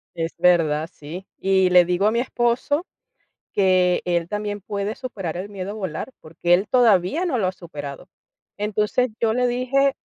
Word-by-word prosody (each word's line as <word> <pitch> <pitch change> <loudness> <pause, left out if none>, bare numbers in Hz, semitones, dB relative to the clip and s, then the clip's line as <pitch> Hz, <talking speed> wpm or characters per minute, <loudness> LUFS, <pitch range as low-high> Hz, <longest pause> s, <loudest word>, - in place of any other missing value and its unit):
Es 165 0 -3
verdad, 165 -3 +3
sí. 170 +6 -9
Y 190 -1 +3
le 180 -1 +6
digo 180 +4 +1
a - - +3
mi 235 - +1
esposo 250 +6 0 0.7
que 185 -2 +3
él 175 -1 0
también 210 0 -3
puede 200 +2 -3
superar 195 -11 -5
el 190 +3 -5
miedo 195 -1 -6
a - - -5
volar, 190 +4 -5
porque 175 +2 +1
él 195 +3 +1
todavía 235 - +3
no 295 -9 0
lo 190 - +1
ha 185 - 0
superado. 150 -2 -9 0.5
Entonces, 210 +4 0
yo 225 -1 +2
le 250 0 +2
dije 265 +3 +1
195 Hz, 175 wpm, -22 LUFS, 175-235 Hz, 0.7 s, le